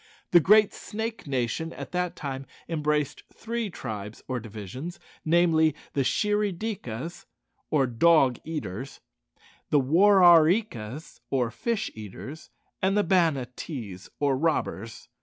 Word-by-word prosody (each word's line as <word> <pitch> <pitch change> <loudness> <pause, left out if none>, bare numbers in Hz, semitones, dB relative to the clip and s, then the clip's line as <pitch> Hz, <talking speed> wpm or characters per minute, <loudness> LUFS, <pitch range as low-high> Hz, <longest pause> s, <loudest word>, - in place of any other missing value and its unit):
The 175 - +8
Great 210 +5 +5
Snake 220 -3 -5
nation 135 +5 -1
at - - -8
that 180 -1 -1
time 135 -1 -5 0.2
embraced 150 -3 -1
three 230 -1 -4
tribes 110 - -7
or 130 -1 -2
divisions 115 - -7 0.2
namely, 160 -2 +3 0.2
the 140 - +1
Shirry 210 +7 +1
dikas, 170 - -5 0.4
or 145 -3 +3
dog 130 +1 +4
eaters; 135 - -5 0.7
the 145 - +4
War 185 +8 +5
are 170 -3 +9
ree 190 +8 +3
kas, 125 - -9
or 125 -4 0
fish 225 - -2
eaters; 110 +8 -9 0.3
and 195 +2 +2
the 205 - +4
Banattees, 130 - -1
or 140 -2 +2
robbers. 130 -7 -2
155 Hz, 125 wpm, -27 LUFS, 125-180 Hz, 0.7 s, are